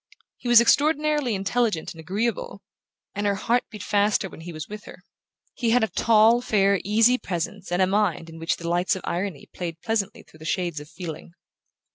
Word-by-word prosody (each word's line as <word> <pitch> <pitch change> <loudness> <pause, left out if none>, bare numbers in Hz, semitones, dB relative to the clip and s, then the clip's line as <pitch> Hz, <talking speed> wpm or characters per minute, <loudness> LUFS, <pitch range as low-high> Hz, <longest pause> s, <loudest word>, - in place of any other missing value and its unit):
He - - -8
was 240 -1 +8
extraordinarily 295 0 +2
intelligent 195 -2 -1
and 165 - -15
agreeable, 230 - -3 0.5
and 205 0 -1
her 200 - +1
heart 235 +5 +1
beat 210 -3 -8
faster 205 -1 +1
when - - -12
he 175 +1 -7
was 155 -1 -7
with 210 0 -9
her. 180 - -13 0.5
He 235 - -1
had 240 +1 +4
a 220 - +1
tall 230 +1 +4
fair 200 -4 +2
easy 225 +5 +4
presence 180 +2 -4
and 180 +2 +3
a - - +5
mind 190 -4 0
in 165 0 -11
which 165 - -1
the 170 - -6
lights 175 +2 +1
of 190 - -7
irony 175 -4 -3
played 165 -2 -5
pleasantly 220 -4 -2
through 155 - -20
the 160 - -11
shades 170 -2 -1
of 150 +1 -11
feeling. 170 -2 -8
200 Hz, 195 wpm, -24 LUFS, 175-230 Hz, 0.5 s, was